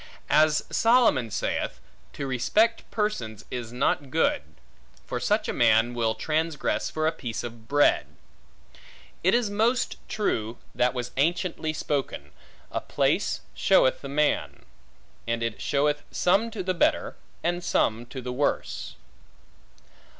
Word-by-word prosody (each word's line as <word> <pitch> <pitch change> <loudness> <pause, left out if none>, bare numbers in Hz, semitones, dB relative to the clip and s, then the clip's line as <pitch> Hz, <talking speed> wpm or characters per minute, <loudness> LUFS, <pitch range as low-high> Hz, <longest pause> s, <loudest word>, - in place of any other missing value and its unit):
As 155 0 +4
Solomon 230 - +4
saith, - - -2 0.3
To 140 - -4
respect 210 - +1
persons 120 - -2
is 120 -2 -5
not 130 +2 0
good; - - +2 0.6
for - - -3
such - - +1
a - - -1
man 115 +2 +4
will 115 -2 0
transgress 160 -1 -1
for 155 0 -2
a 160 - +3
piece 115 -7 -5
of 115 -2 -9
bread. 145 +2 +3 1.2
It 190 +5 +4
is 235 -4 +1
most 225 +5 +1
true, 120 - -1 0.2
that 125 +1 +1
was 125 -1 -3
anciently 165 +1 0
spoken, 140 - -3 0.4
A - - -2
place - - 0
showeth 130 - +3
the 140 - -7
man. 150 +1 0 0.6
And 115 0 -1
it 115 -2 -3
showeth 145 +1 +1
some 200 +6 +2
to 215 -4 -5
the 185 0 0
better, 175 - +1 0.3
and 175 +1 -1
some 115 -7 +1
to 130 +1 -7
the 125 0 -4
worse. 140 +3 -2
145 Hz, 135 wpm, -26 LUFS, 120-175 Hz, 1.2 s, As